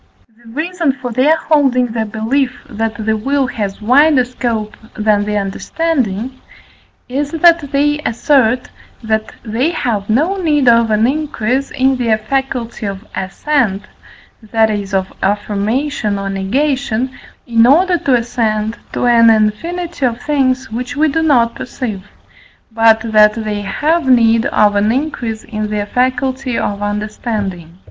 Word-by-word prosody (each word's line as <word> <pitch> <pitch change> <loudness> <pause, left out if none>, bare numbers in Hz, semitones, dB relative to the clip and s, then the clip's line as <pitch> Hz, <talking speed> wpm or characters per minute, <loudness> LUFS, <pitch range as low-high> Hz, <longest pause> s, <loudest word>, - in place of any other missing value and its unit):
The 230 - -14
reason 325 +1 -1
for 250 -2 -6
their 275 +7 +3
holding 270 -6 +2
the 220 -1 -2
belief, 250 +5 -1
that 220 0 -4
the 220 0 +1
will 270 +5 0
has 205 -6 -4
wider 265 +3 +4
scope 230 -4 -3 0.2
than 210 -1 +1
the 210 0 -1
understanding, 245 +2 -2 0.7
is 280 +3 -2
that 330 -2 +3
they 295 +1 +1
assert, 250 0 +1 0.4
that 220 0 -1
they 235 +7 0
have 220 - -2
no 315 - +1
need 295 -6 +1
of 230 -1 +5
an 215 +1 +2
increase 275 -2 -1
in 265 -1 +1
their 230 -3 +1
faculty 240 -1 -3
of 195 +1 -6
assent, 200 +1 -1 0.6
that 220 0 +1
is 205 -1 -4
of 190 0 -1
affirmation 210 +3 -1
or 195 0 -3
negation, 255 +4 -1 0.3
in 230 -1 +4
order 350 +6 +4
to 265 - +2
assent 225 -2 -1 0.2
to - - -1
an 230 -1 +5
infinity 305 +11 0
of 240 -2 0
things 265 -3 0
which 250 +4 -4
we 310 +1 +3
do 325 +3 0
not 245 -7 +3
perceive, 215 -6 -6 0.6
but 225 0 +4
that 210 0 +5
they 215 -2 -3
have 300 +8 0
need 230 -2 +4
of 205 -1 +2
an 205 +2 +2
increase 240 -5 -3
in 215 -2 -4
their 210 -1 -2
faculty 255 +2 -1
of 200 0 -2
understanding. 205 -4 -4
235 Hz, 140 wpm, -15 LUFS, 215-275 Hz, 0.7 s, of